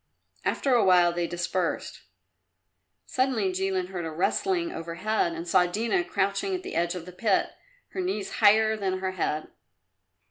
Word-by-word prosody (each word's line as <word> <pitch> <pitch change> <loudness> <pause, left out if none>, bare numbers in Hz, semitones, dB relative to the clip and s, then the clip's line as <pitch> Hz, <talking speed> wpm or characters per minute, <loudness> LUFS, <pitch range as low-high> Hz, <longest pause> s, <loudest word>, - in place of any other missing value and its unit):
After 270 - +1
a 240 - +5
while 175 -2 +5
they 175 0 -1
dispersed. 175 +1 -2 1.0
Suddenly 255 -7 0
Jilin 185 -1 -1
heard 180 -2 -4
a 165 - -3
rustling 340 - 0
overhead 170 +3 -1
and 165 +1 -6
saw 180 0 +4
Dina 230 - 0
crouching 200 - -1
at 365 - -5
the 385 - -6
edge 170 +1 0
of 175 -2 -6
the 180 - -9
pit, 195 +2 +1 0.4
her 375 - -4
knees 360 - -2
higher 220 +1 +5
than 190 -3 -1
her 190 0 -2
head. 155 -4 -2
190 Hz, 155 wpm, -27 LUFS, 175-220 Hz, 1.0 s, a